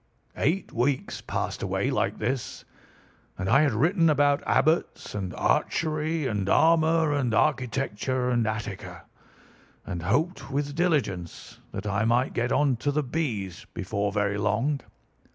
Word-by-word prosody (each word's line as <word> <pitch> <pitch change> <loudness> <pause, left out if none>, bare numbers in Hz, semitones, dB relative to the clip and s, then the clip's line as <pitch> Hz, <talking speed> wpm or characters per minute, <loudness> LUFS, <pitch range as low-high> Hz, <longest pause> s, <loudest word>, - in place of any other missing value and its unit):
"Eight 175 +6 0
weeks 130 +3 -1
passed - - -3
away - - -1
like - - 0
this, 125 +3 -3 0.7
and 95 - -3
I 135 +9 +5
had 145 -5 +2
written 165 - +3
about 145 -1 +3
Abbots 160 +2 +1
and 95 -3 -3
Archery 155 -1 0
and 105 -6 -1
Armour 160 -1 +4
and 125 -6 0
Architecture 130 -1 0
and 120 -3 +1
Attica, 110 -3 -5 0.8
and 85 -2 -4
hoped 140 - 0
with 140 +1 -2
diligence 140 - -1
that 100 +1 -6
I 105 +1 0
might 120 +3 +2
get 120 +1 -1
on 140 -4 +2
to 145 +5 -1
the 150 +1 0
B's 115 - -3
before 100 0 -2
very 100 0 0
long. 115 +8 +1
130 Hz, 135 wpm, -26 LUFS, 105-150 Hz, 0.8 s, I